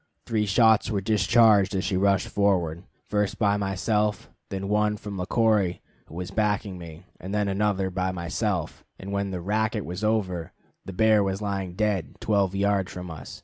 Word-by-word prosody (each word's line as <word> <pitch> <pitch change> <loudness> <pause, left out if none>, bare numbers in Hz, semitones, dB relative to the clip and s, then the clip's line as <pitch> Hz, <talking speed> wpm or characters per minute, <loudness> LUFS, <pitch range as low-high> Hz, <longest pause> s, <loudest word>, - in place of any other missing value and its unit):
Three 110 -2 0
shots 110 +1 +4
were 105 -3 0
discharged 105 0 +4
as 95 - 0
she 95 - -1
rushed 100 0 +2
forward, 90 -4 0 0.2
first 105 -1 0
by 100 -2 +2
myself, 105 +1 -1 0.2
then 95 0 -4
one 105 +1 +1
from 100 -2 -7
Le 90 - -3
Corey, 105 -6 +2 0.3
who 80 - -12
was 90 +1 -5
backing 105 -3 -1
me, 80 -2 -11
and 95 +3 -5
then 105 -1 +1
another 100 -1 0
by 95 0 -1
myself; 85 -2 -3
and 95 +1 -8
when 100 0 -1
the 90 -2 -4
"racket" 105 +2 -1
was 90 +5 -6
over, 95 -7 -1 0.3
the - - -6
bear 110 +2 +4
was 95 0 -2
lying 100 -4 -3
dead 105 -4 -1
twelve 100 -3 +1
yards 100 -1 +1
from 90 -1 -7
us. 80 - -9
100 Hz, 180 wpm, -26 LUFS, 95-105 Hz, 0.3 s, shots